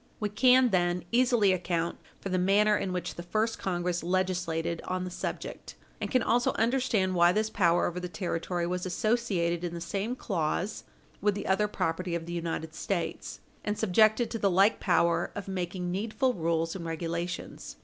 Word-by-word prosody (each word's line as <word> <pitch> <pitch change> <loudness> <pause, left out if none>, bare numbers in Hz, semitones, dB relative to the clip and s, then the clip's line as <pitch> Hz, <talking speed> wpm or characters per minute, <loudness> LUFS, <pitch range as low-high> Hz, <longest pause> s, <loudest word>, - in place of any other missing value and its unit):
We 210 - -1
can, 250 +4 +5
then, 175 -1 +1
easily 240 -5 +4
account 170 -2 -2 0.2
for 195 - -5
the 185 0 +1
manner 205 +3 +4
in 195 - -2
which 180 -1 -3
the - - -7
first 215 +6 -1
Congress 175 -1 -1
legislated 175 -2 -1
on 185 0 -1
the 180 - -5
subject - - -6 0.3
and - - -2
can 255 -3 +2
also 240 +1 +2
understand 230 -5 +1
why 175 -1 +5
this 215 +3 0
power 175 -2 +3
over 175 +1 -2
the 180 0 -5
territory 175 -1 -2
was 180 +1 -2
associated 180 -4 0
in 170 -1 -3
the - - -4
same 200 +7 -3
clause 190 -2 -2 0.4
with 205 -1 +2
the 205 - -4
other 195 +2 +2
property 175 -2 -2
of 165 -1 -4
the 170 - -6
United 165 -2 -3
States, 175 +1 -3 0.2
and 210 0 -2
subjected 220 +3 +3
to 225 - -3
the 200 - +3
like 195 +4 +4
power 170 -2 +2
of 200 -2 -5
making 180 -1 -3
needful 225 +7 0
rules 165 -2 -1
and 180 - -5
regulations. 170 - -4
185 Hz, 180 wpm, -29 LUFS, 170-210 Hz, 0.4 s, can